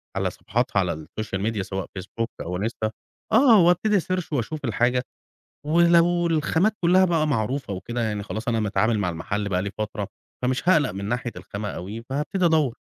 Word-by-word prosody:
على -, -, 0 dB
صفحاتها -, -, -1 dB
على -, -, +1 dB
الSocial 110 Hz, -3 st, -4 dB
Media، 105 Hz, -3 st, -2 dB
سواء 95 Hz, 0 st, -4 dB
Facebook 115 Hz, +5 st, -4 dB
أو 90 Hz, +2 st, -3 dB
Insta، 110 Hz, 0 st, -2 dB, 0.4 s
آه، 230 Hz, -3 st, +7 dB
وأبتدي 200 Hz, +4 st, +3 dB
أسيرش 185 Hz, -2 st, -2 dB
وأشوف 140 Hz, +3 st, -2 dB
الحاجة. 125 Hz, +2 st, +1 dB, 0.6 s
ولو 170 Hz, +1 st, +4 dB
الخامات 165 Hz, +5 st, +2 dB
كلها 185 Hz, +2 st, +5 dB
بقى 165 Hz, -4 st, +2 dB
معروفة 130 Hz, -2 st, -1 dB
وكده، 120 Hz, +6 st, -4 dB
يعني 105 Hz, -2 st, -2 dB
خلاص 110 Hz, +3 st, -5 dB
أنا 115 Hz, -2 st, +1 dB
متعامل 110 Hz, +1 st, +1 dB
مع 95 Hz, -3 st, 0 dB
المحل 100 Hz, +5 st, -3 dB
بقى 90 Hz, -1 st, 0 dB
لي 100 Hz, -, -3 dB
فترة، 105 Hz, -2 st, -3 dB, 0.3 s
فمش 130 Hz, +7 st, 0 dB
هاقلق 155 Hz, -7 st, +4 dB
من 100 Hz, +1 st, -5 dB
ناحية 120 Hz, +2 st, -2 dB
الخامة 105 Hz, +1 st, -5 dB
أوي، 105 Hz, +6 st, -6 dB
فهابتدي. 155 Hz, -, +1 dB
120 Hz, 170 wpm, -24 LUFS, 105-165 Hz, 0.6 s, آه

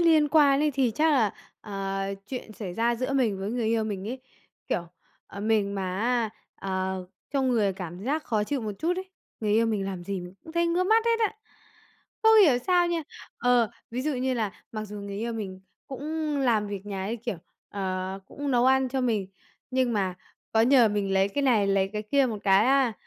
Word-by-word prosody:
liên 315 Hz, -3 st, +5 dB
quan 285 Hz, -3 st, +5 dB
ấy 300 Hz, 0 st, +3 dB
thì 260 Hz, -3 st, +1 dB
chắc 310 Hz, +8 st, +2 dB
là, 225 Hz, -8 st, +3 dB, 0.3 s
ờ, 195 Hz, -1 st, -4 dB, 0.3 s
chuyện 245 Hz, -2 st, -6 dB
xảy 195 Hz, -4 st, -6 dB
ra 235 Hz, +3 st, +2 dB
giữa 255 Hz, +3 st, -2 dB
mình 235 Hz, -8 st, +1 dB
với 195 Hz, +2 st, -3 dB
người 235 Hz, -1 st, -1 dB
yêu 225 Hz, 0 st, +1 dB
mình 200 Hz, -1 st, -4 dB
ấy, 255 Hz, +2 st, -5 dB, 0.5 s
kiểu, 170 Hz, -, -1 dB, 0.4 s
ờ, 200 Hz, -, -9 dB
mình 210 Hz, -2 st, +1 dB
mà 190 Hz, -1 st, -2 dB
á, 235 Hz, 0 st, +1 dB, 0.3 s
à, 190 Hz, -1 st, -2 dB, 0.4 s
trong 270 Hz, -2 st, +1 dB
người 215 Hz, -6 st, +2 dB
cảm 180 Hz, 0 st, -7 dB
giác 300 Hz, +5 st, -1 dB
khó 215 Hz, -3 st, 0 dB
chịu 275 Hz, +5 st, -2 dB
một 215 Hz, -2 st, -3 dB
chút 345 Hz, +3 st, 0 dB
ấy, 375 Hz, 0 st, -6 dB, 0.3 s
người 210 Hz, -2 st, 0 dB
yêu 225 Hz, +2 st, +4 dB
mình 210 Hz, -3 st, 0 dB
làm 185 Hz, -3 st, -5 dB
gì 195 Hz, 0 st, -3 dB
mình 180 Hz, +1 st, -9 dB
cũng 320 Hz, -, -10 dB
thấy 340 Hz, 0 st, +2 dB
ngứa 345 Hz, +2 st, +1 dB
mắt 445 Hz, +3 st, +4 dB
hết 460 Hz, 0 st, +2 dB
á, 440 Hz, 0 st, +1 dB, 0.9 s
không 445 Hz, 0 st, +7 dB
hiểu 265 Hz, -8 st, +4 dB
sao 355 Hz, -1 st, +4 dB
nha. 340 Hz, -1 st, -1 dB, 0.4 s
Ờ, 245 Hz, -3 st, +3 dB, 0.2 s
ví 245 Hz, +2 st, -3 dB
dụ 305 Hz, +2 st, 0 dB
như 255 Hz, 0 st, 0 dB
là 215 Hz, -4 st, -1 dB, 0.2 s
mặc 215 Hz, -1 st, -4 dB
dù 210 Hz, 0 st, -8 dB
người 200 Hz, 0 st, -6 dB
yêu 230 Hz, +2 st, -2 dB
mình 195 Hz, -4 st, -5 dB, 0.3 s
cũng 300 Hz, +2 st, -3 dB
làm 230 Hz, -6 st, +2 dB
việc 200 Hz, 0 st, -6 dB
nhà 195 Hz, -2 st, -4 dB
ấy, 220 Hz, +4 st, -2 dB
kiểu, 235 Hz, -3 st, -4 dB, 0.3 s
ờ, 190 Hz, -1 st, -3 dB
cũng 285 Hz, +5 st, -4 dB
nấu 245 Hz, -1 st, +3 dB
ăn 265 Hz, 0 st, +4 dB
cho 265 Hz, +1 st, -1 dB
mình, 220 Hz, -6 st, 0 dB, 0.4 s
nhưng 255 Hz, -2 st, +1 dB
mà 190 Hz, -4 st, 0 dB, 0.4 s
có 220 Hz, -, +4 dB
nhờ 240 Hz, 0 st, +6 dB
mình 205 Hz, -2 st, -1 dB
lấy 195 Hz, +1 st, +3 dB
cái 285 Hz, +8 st, -2 dB
này, 230 Hz, -7 st, +3 dB
lấy 195 Hz, -1 st, +2 dB
cái 210 Hz, 0 st, -3 dB
kia 270 Hz, +5 st, +2 dB
một 220 Hz, -4 st, -3 dB
cái 195 Hz, +2 st, +5 dB
á, 265 Hz, -3 st, +4 dB
230 Hz, 220 wpm, -27 LUFS, 200-275 Hz, 0.9 s, không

